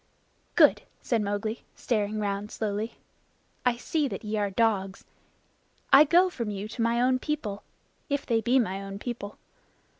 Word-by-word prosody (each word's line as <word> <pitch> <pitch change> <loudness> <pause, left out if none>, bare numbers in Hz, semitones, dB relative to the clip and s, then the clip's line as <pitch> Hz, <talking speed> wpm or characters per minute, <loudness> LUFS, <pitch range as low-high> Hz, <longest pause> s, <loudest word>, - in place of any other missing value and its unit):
"Good!" - - +6 0.2
said 235 -3 +1
Mowgli, 205 +2 -3
staring 215 -2 -1
round 205 0 -2
slowly. 215 +1 -3 0.7
"I 240 -1 +2
see 300 +4 0
that - - -6
ye 215 0 -3
are 205 -1 0
dogs. 195 -2 0 0.9
I 280 +3 +10
go 350 +5 +5
from 235 -11 -4
you 205 0 -4
to 230 - -5
my 230 +1 +2
own 255 +1 +3
people 250 -10 -3 0.5
if 285 -1 -1
they 230 -2 +1
be 240 +4 +3
my 195 -6 0
own 195 0 -6
people. 210 -2 -6
220 Hz, 155 wpm, -27 LUFS, 205-250 Hz, 0.9 s, I